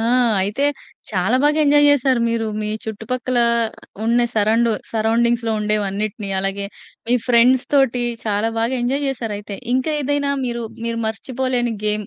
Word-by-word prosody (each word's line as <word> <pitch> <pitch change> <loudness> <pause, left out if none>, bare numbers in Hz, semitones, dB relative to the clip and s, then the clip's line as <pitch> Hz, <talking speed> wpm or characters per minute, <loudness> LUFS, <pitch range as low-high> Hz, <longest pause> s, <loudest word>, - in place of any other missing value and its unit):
ఆ! - - -1 0.4
అయితే 210 +9 -1 0.5
చాలా 195 +5 +1
బాగా 300 +1 +3
ఎంజాయ్ 290 0 +5
చేశారు 265 -3 +2
మీరు. 230 -1 -1
మీ 210 - -3 0.2
చుట్టుపక్కల 240 +3 -3 0.7
ఉన్న 240 +1 +3
సరౌండు 225 +2 +2 0.2
సరౌండింగ్స్‌లో 230 +1 +1
ఉండేవన్నిటిని. 210 0 -2
అలాగే 195 +1 -2 0.4
మీ 245 - +4
ఫ్రెండ్స్‌ 250 +1 +4
తోటి 255 -3 +3 0.2
చాలా 210 +2 0
బాగా 230 +3 0
ఎంజాయ్ 275 +3 0
చేశారు 230 -6 -3
అయితే. 205 -1 -7 0.2
ఇంకా 260 +4 0
ఏదైనా 285 0 0
మీరు, 235 -1 -3 0.2
మీరు 230 0 -2
మర్చిపోలేని 250 +1 -2
గేమ్ 210 -1 -1
235 Hz, 140 wpm, -20 LUFS, 215-255 Hz, 0.7 s, ఎంజాయ్